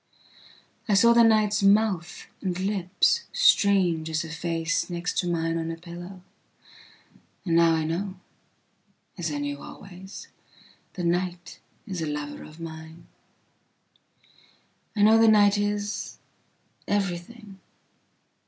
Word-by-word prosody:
I 205 - +4
saw 235 +4 +6
the 235 - +6
night's 215 -2 +3
mouth 195 -3 +2 0.2
and 185 -2 -2
lipsstrange 195 - +2
as 155 0 -1
a 160 - -8
face 165 +1 -2
next 175 0 -2
to 180 - -1
mine 165 -1 -1
on 165 0 -3
a 165 - -4
pillowand 175 +2 -10 1.2
now 165 -1 +4
I 160 - 0
know… 185 +5 -3 1.0
as 165 -2 -2
I 145 - -3
knew 145 0 -4
always 190 0 -11 0.7
…the 180 - -5
night 175 0 -2 0.3
is 190 -6 -5
a 160 - -2
lover 150 0 -5
of 155 +2 -14
mine 160 0 -9 1.9
…I 205 - +2
know 220 +1 +6
the 225 - +6
night 205 -1 +5
is… 205 0 -3 0.7
everything. 195 +1 -3
180 Hz, 115 wpm, -26 LUFS, 165-205 Hz, 1.9 s, saw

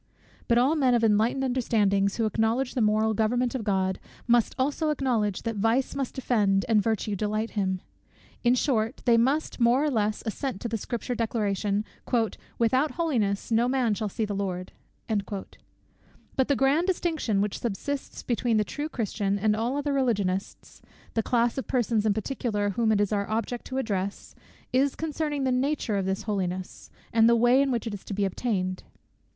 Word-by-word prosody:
But 235 - +3
all 265 +6 +4
men 260 -5 +3
of 235 - +1
enlightened 225 +5 +3
understandings, 210 -6 +1
who 225 - +1
acknowledge 225 +4 0
the 255 - 0
moral 215 +1 +3
government 240 +3 +1
of 260 -4 -3
God, 190 -2 0 0.3
must 240 -1 +3
also 290 +4 0
acknowledge, 240 -9 0
that 225 -2 -3
vice 225 +5 +1
must 275 -2 -4
offend 210 -6 +2
and 220 -3 +4
virtue 215 -1 -1
delight 215 +3 -1
him. 190 -3 -1 0.6
In 240 0 +4
short 240 -2 0
they 240 -2 +5
must, 265 +8 +1
more 240 +4 +4
or 300 - +1
less, 215 -3 0
assent 235 0 -3
to - - -2
the 230 - -2
Scripture 240 +3 -3
declaration, 210 -3 -1 0.7
"without 260 +6 +2
holiness 235 - -1
no 230 +2 +3
man 250 -4 +1
shall 210 0 -2
see 220 +3 -2
the 205 - -4
Lord." 185 -2 -3 0.4
But 205 +5 -5
the 280 - +2
grand 280 +7 +2
distinction, 325 - 0
which 205 0 -1
subsists 265 +5 -4
between 240 -2 +1
the 210 - +3
true 295 +8 -5
Christian 205 -5 -1
and 210 +1 +2
all 235 +5 -1
other 290 0 -1
Religionists, 205 -8 -1 0.3
(the 225 - +1
class 235 +2 +1
of - - -6
persons 230 -4 +1
in 210 - +3
particular 215 -3 -1
whom 220 +2 +1
it 210 - +3
is 205 0 +1
our 200 -1 -1
object 230 +2 -2
to 260 - -4
address) 200 -6 -3 0.4
is 270 +2 +2
concerning 300 -2 -2
the 260 - +1
nature 255 -3 0
of 190 -1 -1
this 190 0 -1
holiness, 185 -3 -3 0.2
and 225 0 +6
the 235 - +5
way 240 +3 +5
in 280 - +1
which 240 -3 -1
it 225 - -3
is 200 - -7
to 200 - -5
be 200 0 +1
obtained. 185 -2 -2
225 Hz, 180 wpm, -27 LUFS, 205-255 Hz, 0.7 s, and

